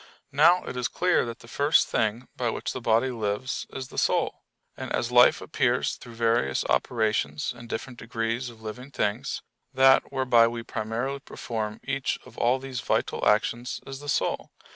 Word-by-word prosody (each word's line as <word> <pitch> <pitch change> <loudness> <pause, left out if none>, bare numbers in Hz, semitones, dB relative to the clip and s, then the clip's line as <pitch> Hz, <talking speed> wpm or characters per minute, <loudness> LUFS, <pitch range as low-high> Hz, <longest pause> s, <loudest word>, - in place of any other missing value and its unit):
Now 170 +6 +5
it - - -6
is 125 -1 0
clear 180 -8 +1
that 115 0 -7
the 115 - -14
first 145 +5 +3
thing 110 +3 0
by 120 -2 0
which - - -3
the 130 - -5
body 115 +3 +2
lives 110 +2 -2
is 130 -1 -6
the - - -3
soul. - - +1 0.3
And - - -6
as 120 - -1
life 125 0 +6
appears 125 -4 +1
through 120 -2 -12
various 115 - +1
operations 105 -11 0
in 120 0 -11
different 120 +2 -5
degrees 115 +2 -2
of 110 -2 -15
living 125 +5 -7
things, 130 +4 -2 0.3
that 135 0 +5
whereby 125 -4 +4
we 115 0 -4
primarily 115 +5 -3
perform 110 -5 -5
each 135 0 -1
of - - -15
all 125 +2 +3
these 130 -2 -5
vital - - 0
actions 120 +3 +1
is 135 0 -7
the 145 0 -7
soul. - - 0
120 Hz, 175 wpm, -26 LUFS, 115-130 Hz, 0.3 s, life